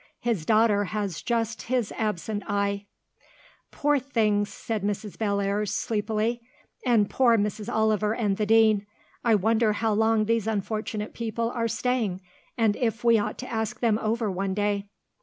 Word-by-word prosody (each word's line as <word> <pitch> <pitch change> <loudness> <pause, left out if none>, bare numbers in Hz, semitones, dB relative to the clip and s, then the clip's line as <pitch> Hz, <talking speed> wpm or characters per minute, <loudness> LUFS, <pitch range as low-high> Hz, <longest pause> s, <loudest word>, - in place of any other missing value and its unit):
His 225 -10 -1
daughter 215 -2 +4
has 200 -4 -3
just 230 -1 -1
his 250 -5 0
absent 210 -1 -2
eye." 200 -1 -1 0.8
"Poor 295 0 +1
things," 215 -6 +1
said 220 -2 -4
Mrs. 205 0 -3
Bellairs, 200 -1 0
sleepily. 220 +2 -1 0.4
"And 230 -5 +3
poor 240 -1 +3
Mrs. 210 +2 -2
Oliver 215 -1 +1
and 205 -5 0
the 210 - 0
Dean. 220 -2 +4 0.4
I 230 -2 +4
wonder 220 +2 +2
how 220 +1 0
long 220 0 +3
these 225 -1 0
unfortunate 215 0 -3
people 230 0 -2
are 230 -2 -1
staying, 225 -4 -1 0.4
and 220 -3 +3
if 225 -3 -1
we 230 -2 +5
ought 210 +1 -3
to 255 - -7
ask 220 +1 -2
them 225 -3 +2
over 220 -1 0
one 190 +1 -2
day?" 205 -1 0
215 Hz, 155 wpm, -26 LUFS, 205-230 Hz, 0.8 s, we